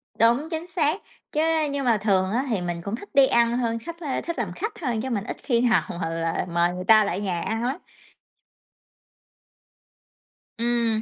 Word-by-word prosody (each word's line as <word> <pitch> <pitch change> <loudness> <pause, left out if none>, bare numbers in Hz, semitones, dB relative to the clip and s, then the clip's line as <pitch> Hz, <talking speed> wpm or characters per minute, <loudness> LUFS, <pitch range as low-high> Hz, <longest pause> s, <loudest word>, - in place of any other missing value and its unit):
Đúng, 240 +8 +3
chính 325 +1 -4
xác, 340 +1 0 0.3
chứ 305 - +1 0.3
nhưng 280 -1 -2
mà 235 -3 +4
thường 195 -2 +1
á 250 +5 0
thì 215 -6 0
mình 175 -1 -3
cũng 200 +5 -3
thích 405 - -11
đi 275 -2 +6
ăn 235 -1 +3
hơn, 230 -2 -1
khách, 335 +8 -8
a, 290 -6 -2
thích 335 -4 -4
làm 205 -6 -2
khách 435 +3 -3
thôi, 245 -7 -1
chứ 265 - -3
mình 210 -5 -1
ít 230 - -5
khi 235 -4 +2
nào 240 -2 +3 0.2
mà 165 - -1
là 165 +1 -1
mời 170 +1 +2
người 180 0 -5
ta 215 0 +7
lại 200 0 -2
nhà 180 -4 -2
ăn 225 +5 -2
lắm. 260 +3 -1 2.8
Ừm, 235 -1 +1
230 Hz, 195 wpm, -25 LUFS, 200-275 Hz, 2.8 s, ta